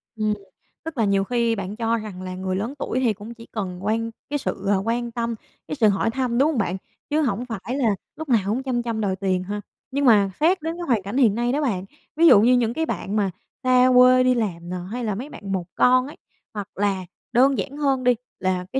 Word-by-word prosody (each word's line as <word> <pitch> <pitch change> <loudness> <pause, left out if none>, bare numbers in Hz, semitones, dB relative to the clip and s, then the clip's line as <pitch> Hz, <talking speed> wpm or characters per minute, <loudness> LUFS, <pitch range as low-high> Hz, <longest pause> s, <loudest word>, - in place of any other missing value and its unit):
Ừm, 215 -1 0 0.5
tức 320 -3 -7
là 225 - +2
nhiều 195 -1 +2
khi 235 +1 +1
bạn 195 0 -5
cho 230 0 0
rằng 210 -4 -7
là 185 0 -5
người 185 0 -2
lớn 220 +7 -2
tuổi 255 - -1
thì 240 -4 +2
cũng 210 +3 -9
chỉ 230 -1 -13
cần 190 -3 -5
quan 225 +2 0 0.2
cái 290 +1 -1
sự 200 -6 -3 0.2
quan 235 +1 -1
tâm, 235 0 -2 0.3
cái - - -3
sự 230 -6 +4
hỏi 200 +3 +1
thăm, 250 -1 -1
đúng 280 +4 +4
hông 295 - -3
bạn? 190 -4 0 0.3
Chứ 305 +1 +2
hổng 245 -4 -1
phải 230 +2 -4 0.4
lúc 315 -1 -7
nào 235 -3 +5
cũng 225 +6 -1
chăm 250 -2 -1
chăm 230 -2 -2
đòi 195 -3 0
tiền 185 -1 -1
ha. 205 +2 -4 0.3
Nhưng 280 +1 0
mà 205 -5 +5
xét 355 +5 +3
đến 325 +2 -3
cái 350 - -5
hoàn 235 -6 +2
cảnh 200 +6 -4
hiện 230 -7 +4
nay 240 +1 0
đó 290 +3 0
bạn, 200 -10 -1 0.3
ví 335 +2 +5
dụ 205 - +8
như 240 +3 +5
những 235 -2 +2
cái 320 +5 -1
bạn 205 - -3
mà 200 -3 +1 0.3
xa 255 0 +5
quê 255 0 +7
đi 255 0 +4
làm 175 -7 -3
nè, 180 - -3 0.2
hay 230 -4 -2
mấy 255 +8 -6
bạn 200 -8 -8
một 185 -3 -1
con 255 +1 +4
ấy, 295 - -11 0.4
hoặc 205 -2 -5
là 195 -2 0 0.3
đơn 265 +3 +4
giản 280 - -4
hơn 275 -3 +1
đi 250 0 +4 0.2
là 185 -1 -1
cái 265 - +1
230 Hz, 245 wpm, -23 LUFS, 200-255 Hz, 0.5 s, dụ